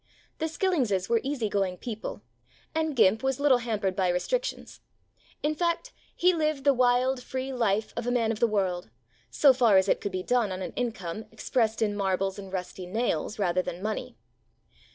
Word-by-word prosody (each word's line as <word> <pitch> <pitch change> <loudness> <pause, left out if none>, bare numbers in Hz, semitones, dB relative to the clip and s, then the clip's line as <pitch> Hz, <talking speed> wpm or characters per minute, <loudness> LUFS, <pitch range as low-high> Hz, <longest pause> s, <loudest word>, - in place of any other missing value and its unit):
The 320 - 0
Skillingses 285 - 0
were 235 -1 +3
easy 270 -5 -2
going 195 -3 -1
people, 215 - -6 0.5
and 315 -2 -1
Gimp 220 -2 +4
was 265 0 0
little 280 -3 +4
hampered 210 -5 -1
by 185 -2 +2
restric - - 0
tions; - - -7 0.6
in 300 +1 +2
fact, 340 +9 -1 0.2
he 365 +1 +4
lived 305 -4 0
the 280 0 +5
wild, 250 +1 +2
free 260 +1 -4
life 220 -4 0
of 240 0 -3
a - - +1
man 230 -2 +2
of 220 - -4
the 235 - +4
world, 185 - -1 0.4
so 275 - +5
far 235 -6 +5
as 190 - +4
it - - +2
could 200 - -3
be 185 0 -3
done 240 -3 +1
on 185 0 -4
an - - -5
income 215 -4 -4
exprest 225 0 0
in 205 -1 0
marbles 195 -1 -1
and 195 -1 -9
rusty 185 -1 -5
nails, 215 -2 -1
rather 185 -3 +1
than 180 +1 -6
money. 215 0 -4
225 Hz, 190 wpm, -28 LUFS, 195-265 Hz, 0.6 s, the